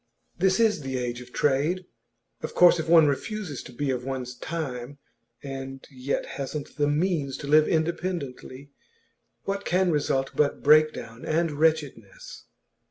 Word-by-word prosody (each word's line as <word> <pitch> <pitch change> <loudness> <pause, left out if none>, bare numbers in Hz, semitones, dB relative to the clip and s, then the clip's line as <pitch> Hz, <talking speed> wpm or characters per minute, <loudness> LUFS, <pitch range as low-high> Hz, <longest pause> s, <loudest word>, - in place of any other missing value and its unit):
This 190 +3 +2
is 220 -7 +3
the 135 -1 -3
age 120 -1 -3
of 125 0 -13
trade. 150 +8 +1 0.6
Of - - -6
course 175 -1 +6
if 160 - -3
one 165 -2 +7
refuses 150 - -2
to - - -11
be 135 +3 -2
of 125 -1 -3
one's 130 -1 -4
time, 140 -4 -5 0.5
and 135 -1 -7
yet 130 +1 -2
hasn't 140 +2 -6
the 145 -1 +2
means 145 -3 0
to - - -8
live 155 +1 +5
independently, 155 -5 -3 0.7
what 200 0 -3
can 180 0 +2
result 135 -3 0
but 145 -1 +1
breakdown 150 -6 +3
and 165 +1 0
wretchedness? 160 - -2
145 Hz, 145 wpm, -26 LUFS, 135-170 Hz, 0.7 s, one